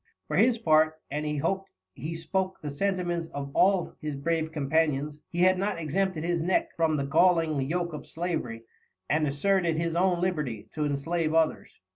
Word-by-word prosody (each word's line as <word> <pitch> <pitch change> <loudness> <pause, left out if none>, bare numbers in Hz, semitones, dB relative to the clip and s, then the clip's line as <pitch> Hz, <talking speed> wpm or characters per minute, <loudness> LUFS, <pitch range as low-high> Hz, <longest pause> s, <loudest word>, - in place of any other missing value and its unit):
For - - -2
his 240 +1 +4
Part, 155 -5 +3
and 150 +1 -2
he 150 0 -1
hop'd 190 +6 -1 0.2
he 160 - -5
spoke 185 +3 -2
the 150 -2 -5
Sentiments 175 0 -1
of 140 -1 -4
all 190 -2 +3
his 150 -2 -3
brave 160 +2 -1
Companions, 150 -1 0
he 175 - -2
had 185 0 +5
not 200 0 -1
exempted 170 +1 -1
his 170 -1 0
Neck 180 +3 +1
from 160 -2 +2
the 140 - -1
galling 165 0 +3
Yoak 175 0 -1
of 150 - -7
Slavery, 160 -10 -3 0.4
and 155 0 +2
asserted 170 +3 +1
his 165 0 -1
own 180 0 +2
Liberty, 150 - -2
to 150 -1 -2
enslave 155 +3 -1
others. 160 -10 0
165 Hz, 175 wpm, -28 LUFS, 150-180 Hz, 0.4 s, had